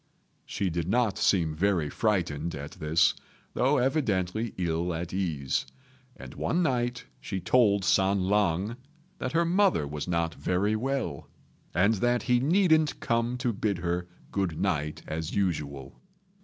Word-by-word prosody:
She 95 -3 -2
did 85 0 -2
not 120 -2 +1
seem 85 -5 +2
very 85 -1 +1
frightened 85 -5 -1
at 70 +1 -7
this, 80 0 +2 0.4
though 135 +4 +2
evidently 115 - 0
ill 85 -1 -1
at 85 +2 -5
ease; 80 -8 -1 0.5
and - - -10
one 175 +2 0
night 120 -4 -1
she 95 - -4
told 100 -2 +3
San 95 0 +3
lang 100 +2 +1 0.4
that 130 - -3
her 170 +1 +3
mother 180 - +3
was 75 +2 -5
not 85 -2 0
very 100 +4 0
well, 120 - -3 0.4
and 100 +5 +3
that 120 +3 +1
he 125 -1 +3
needn't 160 +1 +3
come 115 +1 0
to 125 -1 -1
bid 100 -1 -1
her 85 +1 -2 0.2
good 95 -6 -1
night 75 +1 -1
as 80 +1 -4
usual. 75 -8 -2
95 Hz, 140 wpm, -28 LUFS, 85-120 Hz, 0.5 s, told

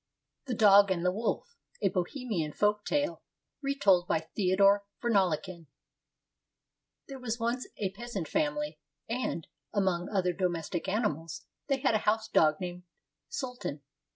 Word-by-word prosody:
THE 250 - -1
DOG 200 -2 +7
AND 180 -2 0
THE 180 - +4
WOLF 230 - -2 0.3
A - - +4
BOHEMIAN 185 - -2
FOLK 210 0 +1
TALE 295 +2 0 0.4
RETOLD 205 -11 +3
BY 160 0 -1
THEODOR 200 +1 +4 0.2
VERNALEKEN 185 -6 0 1.4
There 270 -1 -8
was 240 -2 -3
once 235 +2 -1
a 195 -3 -1
peasant 205 -5 -5
family, 150 +1 -1 0.3
and, 230 -8 -2 0.3
among 190 -3 0
other 185 -3 +1
domestic 175 -1 -2
animals, 175 -6 -2 0.2
they 275 -2 0
had 265 - +3
a 215 - +3
house 220 +1 +1
dog 155 -7 +4
named 180 -1 -5 0.5
Sultan. 250 - -5
200 Hz, 130 wpm, -30 LUFS, 175-235 Hz, 1.4 s, DOG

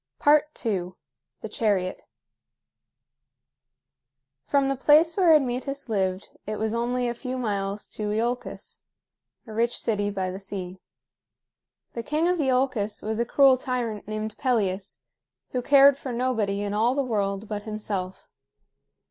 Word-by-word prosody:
II. 235 -11 +2 0.5
THE - - -5
CHARIOT. 200 -4 -1 2.5
From 280 -1 +2
the 275 - 0
place 310 +5 +5
where 360 -4 +5
Admetus 275 0 -1
lived 190 -2 -1 0.2
it 215 - -2
was 220 +1 -1
only 245 +1 0
a 240 - -1
few 255 +1 -5
miles 200 -4 -2
to 210 -1 -3
Iolcus, 235 +3 -3 0.6
a 220 - -10
rich 235 +2 +1
city 205 -2 0
by 190 -2 -2
the 190 - -6
sea. 190 -2 -7 1.1
The 235 - -3
king 305 +7 0
of 360 -1 +1
Iolcus 255 -6 0
was 220 +1 -2
a 235 - +1
cruel 270 +1 +5
tyrant 240 -5 -3
named 215 0 -4
Pelias, 205 -6 -1 0.5
who 250 - -1
cared 280 +1 +6
for 260 - -5
nobody 225 -5 0
in 205 0 -3
all 230 +5 +2
the 280 - +1
world 205 -3 -2
but 210 -1 -4
himself. 205 -3 -5
225 Hz, 135 wpm, -26 LUFS, 205-260 Hz, 2.5 s, cared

